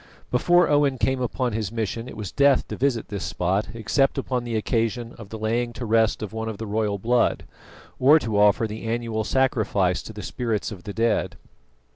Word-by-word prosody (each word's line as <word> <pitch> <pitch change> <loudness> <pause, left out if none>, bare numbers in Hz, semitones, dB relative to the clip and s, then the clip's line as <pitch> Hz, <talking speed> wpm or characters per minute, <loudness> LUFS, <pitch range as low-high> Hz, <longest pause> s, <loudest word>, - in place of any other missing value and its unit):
Before 175 +8 +4
Owen 145 -2 +2
came 130 +1 0
upon 125 0 -1
his 110 -2 -2
mission 115 +1 -3
it - - -10
was 100 -4 -5
death 140 -2 +3
to - - -4
visit 130 -3 0
this 100 -2 -4
spot 95 +4 -1
except 135 +4 +1
upon 125 -2 -1
the 120 -1 -3
occasion 115 +1 -1
of 105 -4 -10
the 110 - -6
laying 120 +2 -1
to 120 - -6
rest 110 0 +2
of 110 - -6
one 110 0 -3
of 110 - -6
the 110 - -5
royal 105 -1 -1
blood, 120 +4 +1 0.6
or 140 +5 +7
to 110 -9 -1
offer 105 +2 +4
the 110 +1 -6
annual 115 -1 -2
sacrifice 110 -8 +1
to - - -9
the 105 -1 -8
spirits 115 -3 -2
of 95 -4 -10
the 100 - -5
dead. 115 0 0
115 Hz, 200 wpm, -24 LUFS, 105-125 Hz, 0.6 s, or